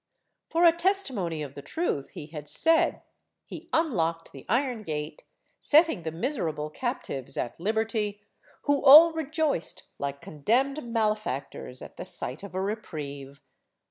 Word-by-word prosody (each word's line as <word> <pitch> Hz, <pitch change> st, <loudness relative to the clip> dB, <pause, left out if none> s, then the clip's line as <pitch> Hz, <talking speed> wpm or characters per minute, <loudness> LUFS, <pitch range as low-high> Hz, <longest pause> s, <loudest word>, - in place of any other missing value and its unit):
For 335 Hz, +1 st, +1 dB
a 335 Hz, -, +9 dB
testimony 275 Hz, -, 0 dB
of 140 Hz, -2 st, -8 dB
the 140 Hz, -, -8 dB
truth 140 Hz, -, -2 dB
he -, -, -6 dB
had 150 Hz, -1 st, -8 dB
said, 330 Hz, +1 st, +2 dB, 0.4 s
he 330 Hz, +2 st, -10 dB
unlocked 170 Hz, -, 0 dB
the 135 Hz, -, -12 dB
iron 245 Hz, -1 st, 0 dB
gate, 150 Hz, -4 st, -5 dB, 0.4 s
setting 310 Hz, -, +4 dB
the 160 Hz, -1 st, -4 dB
miserable 165 Hz, -, -2 dB
captives 240 Hz, -, -3 dB
at 120 Hz, -, -3 dB
liberty, 215 Hz, +1 st, -1 dB, 0.4 s
who 285 Hz, -1 st, +1 dB
all 310 Hz, +4 st, +10 dB
rejoiced 310 Hz, -, -1 dB, 0.2 s
like 140 Hz, 0 st, -3 dB
condemned 255 Hz, -, 0 dB
malefactors 210 Hz, -, -2 dB
at -, -, -12 dB
the -, -, -5 dB
sight 130 Hz, +5 st, -4 dB
of 200 Hz, -2 st, -9 dB
a 190 Hz, -, 0 dB
reprieve. 145 Hz, -9 st, -6 dB
210 Hz, 140 wpm, -27 LUFS, -, 0.4 s, all